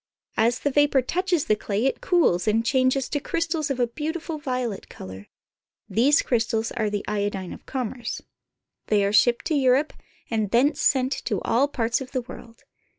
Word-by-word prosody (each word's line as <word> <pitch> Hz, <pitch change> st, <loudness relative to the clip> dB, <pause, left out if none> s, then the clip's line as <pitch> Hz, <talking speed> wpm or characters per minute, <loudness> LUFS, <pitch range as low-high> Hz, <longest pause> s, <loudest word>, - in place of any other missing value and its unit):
As 235 Hz, +2 st, +3 dB
the 285 Hz, -, 0 dB
vapor 290 Hz, -1 st, +3 dB
touches 355 Hz, +2 st, 0 dB
the 215 Hz, -, +3 dB
clay 210 Hz, +2 st, -2 dB
it 270 Hz, -, 0 dB
cools 255 Hz, -, +2 dB
and 225 Hz, +2 st, +2 dB
changes 260 Hz, +1 st, +2 dB
to 290 Hz, -, -1 dB
crystals 330 Hz, 0 st, -2 dB
of 270 Hz, -2 st, -2 dB
a 245 Hz, -, +4 dB
beautiful 310 Hz, +6 st, -4 dB
violet 250 Hz, -7 st, -3 dB
color. 95 Hz, +2 st, -10 dB, 0.6 s
These 275 Hz, +6 st, +3 dB
crystals 225 Hz, -2 st, 0 dB
are 220 Hz, -3 st, -1 dB
the 205 Hz, -1 st, -3 dB
iodine 205 Hz, -3 st, -2 dB
of -, -, -13 dB
commerce. 250 Hz, -2 st, -4 dB, 0.7 s
They 205 Hz, -2 st, +3 dB
are 200 Hz, -, 0 dB
shipped 235 Hz, +3 st, +4 dB
to 325 Hz, -, 0 dB
Europe, 275 Hz, +1 st, +3 dB, 0.4 s
and 215 Hz, -3 st, 0 dB
thence 260 Hz, +7 st, +2 dB
sent 260 Hz, -1 st, +2 dB
to 205 Hz, -, 0 dB
all 250 Hz, +5 st, +2 dB
parts 240 Hz, -2 st, -1 dB
of 265 Hz, 0 st, -8 dB
the 255 Hz, -, 0 dB
world. 230 Hz, -1 st, -12 dB
250 Hz, 175 wpm, -24 LUFS, 220-285 Hz, 0.7 s, a